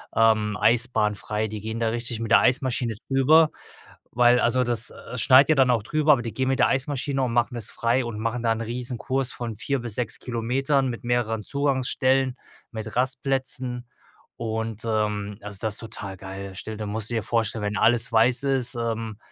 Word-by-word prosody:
ähm, 110 Hz, -2 st, +3 dB
Eisbahn 115 Hz, -3 st, +2 dB
frei. 105 Hz, +2 st, -3 dB
Die 105 Hz, 0 st, -6 dB
gehen 110 Hz, +2 st, -4 dB
da 115 Hz, -1 st, +1 dB
richtig 120 Hz, 0 st, -3 dB
mit 115 Hz, -1 st, -4 dB
der 120 Hz, -, +8 dB
Eismaschine 125 Hz, -3 st, +1 dB
drüber, 150 Hz, +4 st, +5 dB, 0.6 s
weil 120 Hz, 0 st, +5 dB
Also, 125 Hz, +2 st, +2 dB
das, 120 Hz, +1 st, -1 dB
äh, 125 Hz, -, -9 dB
schneit 130 Hz, +3 st, +6 dB
ja 155 Hz, -, +5 dB
dann 130 Hz, -2 st, +4 dB
auch 115 Hz, -4 st, +1 dB
drüber, 155 Hz, +5 st, +2 dB
aber 130 Hz, -, 0 dB
die 115 Hz, -2 st, -5 dB
gehen 130 Hz, 0 st, -1 dB
mit 135 Hz, -, 0 dB
der -, -, +5 dB
Eismaschine 135 Hz, 0 st, -1 dB
und 125 Hz, -, -1 dB
machen 120 Hz, +1 st, +1 dB
es 115 Hz, -2 st, -4 dB
frei 120 Hz, +3 st, +1 dB
und 115 Hz, -3 st, -5 dB
machen 115 Hz, +2 st, -2 dB
da 115 Hz, -, +2 dB
'n 115 Hz, -, -1 dB
Riesenkurs 125 Hz, +3 st, -3 dB
von 115 Hz, -2 st, -5 dB
4 140 Hz, +6 st, -2 dB
bis 120 Hz, -3 st, -6 dB
6 120 Hz, -3 st, -3 dB
Kilometern 130 Hz, +3 st, 0 dB
mit 120 Hz, +1 st, -6 dB
mehreren 115 Hz, -3 st, 0 dB
Zugangsstellen, 130 Hz, -1 st, +1 dB, 0.4 s
mit 110 Hz, -1 st, -6 dB
Rastplätzen. 130 Hz, -1 st, -1 dB, 0.5 s
Und, 110 Hz, -1 st, -4 dB
ähm, 105 Hz, -2 st, -1 dB
also, 100 Hz, -1 st, -8 dB
das 110 Hz, -2 st, -1 dB
ist -, -, -5 dB
total 105 Hz, -4 st, -6 dB
geil. 95 Hz, +1 st, -8 dB
Stell 110 Hz, +3 st, -6 dB
dir 105 Hz, 0 st, -5 dB
musst 105 Hz, +1 st, -3 dB
du 120 Hz, -, -5 dB
dir 115 Hz, -, -1 dB
vorstellen, 115 Hz, -2 st, -1 dB
wenn 105 Hz, 0 st, -2 dB
alles 120 Hz, +2 st, +3 dB
weiß 120 Hz, +4 st, +3 dB
ist, 135 Hz, -2 st, +1 dB
ähm, 115 Hz, -2 st, -3 dB
120 Hz, 195 wpm, -25 LUFS, 110-130 Hz, 0.6 s, der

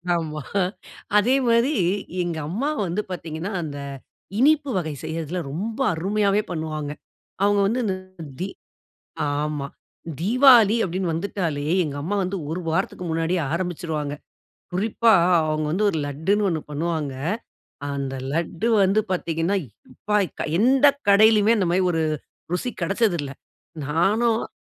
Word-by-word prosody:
ஆமா. 155 Hz, -2 st, -3 dB, 0.8 s
அதே 240 Hz, +6 st, +4 dB
மாரி 235 Hz, +5 st, +3 dB, 0.5 s
எங்கம்மா 175 Hz, -, -2 dB, 0.2 s
வந்து 180 Hz, +4 st, -1 dB
பார்த்தீங்கன்னா, 170 Hz, +2 st, -5 dB
அந்த 145 Hz, -2 st, -6 dB, 0.6 s
இனிப்பு 290 Hz, +1 st, +4 dB
வகை 160 Hz, -4 st, -2 dB
செய்றதில 165 Hz, +2 st, -3 dB
ரொம்ப 220 Hz, -, -4 dB
அருமையாவே 200 Hz, +4 st, +1 dB
பண்ணுவாங்க. 155 Hz, -3 st, -3 dB, 0.5 s
அவங்க 205 Hz, 0 st, +3 dB
வந்து 245 Hz, +4 st, 0 dB
இந்த 190 Hz, -3 st, 0 dB, 0.5 s
தீ 185 Hz, -, -1 dB, 0.8 s
ஆமா. 145 Hz, 0 st, -2 dB, 0.5 s
தீவாளி 235 Hz, +1 st, +6 dB
அப்டின்னு 185 Hz, -1 st, -2 dB
வந்துட்டாலே 165 Hz, -4 st, -2 dB, 0.2 s
எங்கம்மா 145 Hz, +5 st, -3 dB
வந்து 185 Hz, +2 st, -2 dB
ஒரு 175 Hz, +3 st, -2 dB
வாரத்துக்கு 165 Hz, +2 st, -1 dB
முன்னாடியே 165 Hz, +2 st, 0 dB
ஆரம்பிச்சுருவாங்க. 165 Hz, -4 st, -2 dB, 0.6 s
குறிப்பா 220 Hz, +3 st, +3 dB, 0.3 s
அவங்க 155 Hz, 0 st, 0 dB
வந்து 205 Hz, +5 st, +2 dB
ஒரு 165 Hz, -, -2 dB
லட்டுன்னு 175 Hz, +9 st, 0 dB
ஒண்ணு 160 Hz, -3 st, -1 dB
பண்ணுவாங்க. 155 Hz, -2 st, -2 dB, 0.8 s
அந்த 135 Hz, -1 st, -3 dB, 0.2 s
லட்டு 170 Hz, +6 st, -1 dB, 0.2 s
வந்து 195 Hz, +3 st, +3 dB
பார்த்தீங்கன்னா, 170 Hz, +2 st, 0 dB, 0.4 s
எப்பா! 210 Hz, +9 st, -2 dB, 0.4 s
எந்த 265 Hz, +5 st, +5 dB, 0.2 s
கடையிலயுமே 215 Hz, +2 st, +6 dB
அந்த 185 Hz, -, +1 dB
மாரி 185 Hz, -, +3 dB
ஒரு 160 Hz, -1 st, 0 dB, 0.5 s
ருசி 245 Hz, +8 st, -1 dB
கெடச்சதில்ல. 175 Hz, -, 0 dB, 0.6 s
நானும் 215 Hz, -, +1 dB
180 Hz, 115 wpm, -23 LUFS, 160-210 Hz, 0.8 s, தீவாளி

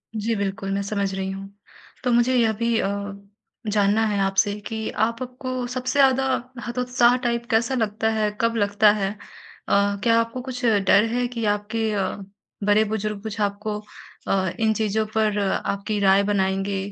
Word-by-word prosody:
जी, 220 Hz, +1 st, -1 dB
बिल्कुल 195 Hz, -1 st, -3 dB
मैं 200 Hz, 0 st, 0 dB
समझ 200 Hz, -1 st, -2 dB
रही 190 Hz, 0 st, -3 dB
हूँ। 195 Hz, 0 st, -7 dB, 0.5 s
तो 250 Hz, -, +1 dB
मुझे 240 Hz, +2 st, +3 dB
यह 225 Hz, -2 st, +3 dB
भी 230 Hz, +1 st, 0 dB
अ, 200 Hz, 0 st, -2 dB, 0.6 s
जानना 210 Hz, +1 st, +3 dB
है 205 Hz, -2 st, 0 dB
आपसे 195 Hz, +1 st, +2 dB
कि 220 Hz, -1 st, -4 dB
आप 230 Hz, +3 st, -1 dB
आपको 255 Hz, 0 st, -4 dB
सबसे 255 Hz, 0 st, -3 dB
ज़्यादा 265 Hz, -1 st, +5 dB, 0.4 s
हतोत्साह 245 Hz, 0 st, +2 dB
टाइप 235 Hz, 0 st, -1 dB
कैसा 230 Hz, +4 st, +2 dB
लगता? 220 Hz, -1 st, 0 dB
है 215 Hz, -1 st, +1 dB
कब 230 Hz, 0 st, +1 dB
लगता 205 Hz, 0 st, +4 dB
है? 200 Hz, -2 st, -1 dB
अ, 200 Hz, -1 st, -2 dB
क्या 230 Hz, -1 st, +4 dB
आपको 230 Hz, +2 st, -2 dB
कुछ 250 Hz, -1 st, -5 dB
डर 205 Hz, -2 st, +4 dB
है 245 Hz, 0 st, +1 dB
कि 235 Hz, -2 st, -4 dB
आपके 220 Hz, +1 st, -2 dB
अ, 195 Hz, -1 st, -1 dB, 0.5 s
बड़े-बुजुर्ग 210 Hz, 0 st, +1 dB
कुछ 220 Hz, 0 st, -5 dB
आपको 205 Hz, +1 st, -2 dB, 0.5 s
अ, 190 Hz, -2 st, +1 dB
इन 220 Hz, -1 st, +3 dB
चीज़ों 215 Hz, 0 st, 0 dB
पर 215 Hz, -1 st, +2 dB, 0.3 s
आपकी 205 Hz, +1 st, -2 dB
राय 195 Hz, 0 st, +4 dB
बनाएँगे 195 Hz, 0 st, 0 dB
215 Hz, 165 wpm, -23 LUFS, 200-230 Hz, 0.6 s, ज़्यादा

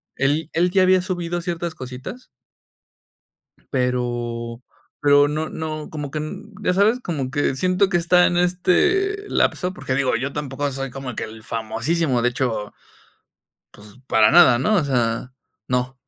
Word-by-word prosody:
él 145 Hz, +4 st, 0 dB
él 175 Hz, +2 st, +2 dB
ya 190 Hz, -1 st, +3 dB
había 185 Hz, 0 st, +4 dB
subido 175 Hz, -2 st, -3 dB
ciertas 170 Hz, -1 st, -4 dB
cositas. 130 Hz, -, -8 dB, 1.5 s
Pero 120 Hz, -2 st, -2 dB, 0.4 s
pero 145 Hz, 0 st, +5 dB
no 155 Hz, +1 st, -2 dB
no, 155 Hz, -1 st, -5 dB
como 145 Hz, -3 st, -5 dB
que 155 Hz, -, -4 dB
n 195 Hz, +8 st, -7 dB
ya 180 Hz, -, +2 dB
sabes, 215 Hz, +6 st, +3 dB
como 145 Hz, -, -3 dB
que 145 Hz, -2 st, 0 dB
siento 185 Hz, +5 st, +2 dB
que 175 Hz, -, +2 dB
está 180 Hz, +1 st, +4 dB
en 175 Hz, -, 0 dB
este 360 Hz, -, +1 dB
lapso, 180 Hz, 0 st, +1 dB
porque 130 Hz, -, -3 dB
digo, 135 Hz, -1 st, +1 dB
yo 135 Hz, +4 st, -3 dB
tampoco 145 Hz, -1 st, -3 dB
soy 135 Hz, +1 st, -4 dB
como 135 Hz, -3 st, -6 dB
que -, -, -3 dB
el 110 Hz, 0 st, -12 dB
famosísimo, 120 Hz, +5 st, -1 dB
de 125 Hz, -, +4 dB
hecho, 120 Hz, -5 st, -3 dB, 1.0 s
pues, 105 Hz, 0 st, -15 dB
para 110 Hz, -1 st, +5 dB
nada, 160 Hz, -8 st, +7 dB
¿no?, 215 Hz, +10 st, +2 dB
o 180 Hz, -, +3 dB
sea, 125 Hz, -2 st, -1 dB, 0.3 s
no, 125 Hz, +1 st, -1 dB
145 Hz, 155 wpm, -22 LUFS, 125-180 Hz, 1.5 s, nada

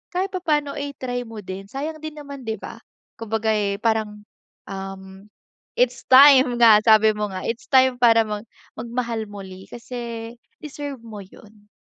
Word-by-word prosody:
kahit 380 Hz, +2 st, -1 dB
papaano 300 Hz, -7 st, -1 dB
i-try 255 Hz, -4 st, -5 dB
mo 220 Hz, -2 st, -9 dB
din, 190 Hz, +1 st, -8 dB
sayang 305 Hz, +6 st, -5 dB
din 310 Hz, 0 st, -8 dB
naman 280 Hz, -4 st, -10 dB
'di 220 Hz, -, -1 dB
ba? -, -, -9 dB, 0.4 s
Kumbaga, 220 Hz, 0 st, -1 dB
eh, 205 Hz, -2 st, 0 dB
parang, 215 Hz, -2 st, -1 dB, 0.5 s
um, 195 Hz, +1 st, -9 dB, 0.5 s
it's -, -, 0 dB
time 260 Hz, -2 st, +7 dB
nga 230 Hz, -3 st, +7 dB
sabi 220 Hz, 0 st, +6 dB
mo 210 Hz, 0 st, -3 dB
nga, 185 Hz, -1 st, -7 dB
it's 230 Hz, 0 st, -4 dB
time 260 Hz, -2 st, +4 dB
para 230 Hz, -2 st, +5 dB
mag 210 Hz, +1 st, -6 dB, 0.3 s
mag-mahal 235 Hz, -2 st, -3 dB
muli 190 Hz, -2 st, -10 dB
kasi 235 Hz, -1 st, -7 dB, 0.3 s
deserve 285 Hz, -4 st, -7 dB
mo 220 Hz, -2 st, -9 dB
yun. 205 Hz, +2 st, -16 dB
230 Hz, 150 wpm, -22 LUFS, 210-265 Hz, 0.5 s, time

